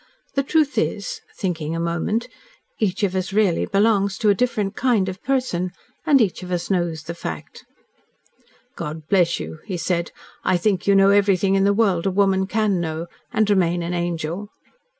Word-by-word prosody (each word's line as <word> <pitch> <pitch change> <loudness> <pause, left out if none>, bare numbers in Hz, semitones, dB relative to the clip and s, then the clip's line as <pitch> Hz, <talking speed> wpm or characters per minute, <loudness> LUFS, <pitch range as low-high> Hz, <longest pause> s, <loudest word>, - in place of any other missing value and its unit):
The 275 - +2
truth 295 +1 +1
is - - -2
" - - -28
thinking 165 -5 -2
a - - -2
moment, 170 +7 -1 0.5
"each 200 -2 0
of 190 -2 +1
us 185 0 -2
really 200 -4 +2
belongs 200 -1 +2
to 215 - +2
a - - +6
different 210 -3 -1
kind 235 -7 +2
of 185 +1 -5
person. 250 -10 0 0.4
And 285 -2 +6
each 205 -6 +1
of 180 - -8 0.2
knows 170 -4 0
the 165 +2 -5
fact." 80 - -7 1.1
"God 155 +1 -6
bless 175 -3 +3
you," 160 - -7
he 185 -4 -3
said. 170 0 -1 0.3
"I 185 - +2
think 190 0 0
you 200 - +5
know 195 0 +6
everything 195 -1 +3
in 195 0 +3
the 200 - +4
world 200 -4 +2
a - - +3
woman 190 0 +2
can 210 -3 +1
know 160 0 -3 0.3
and 215 -1 +2
remain 175 -4 +2
an 170 +1 -3
angel." 175 +3 -3
190 Hz, 180 wpm, -22 LUFS, 170-210 Hz, 1.1 s, a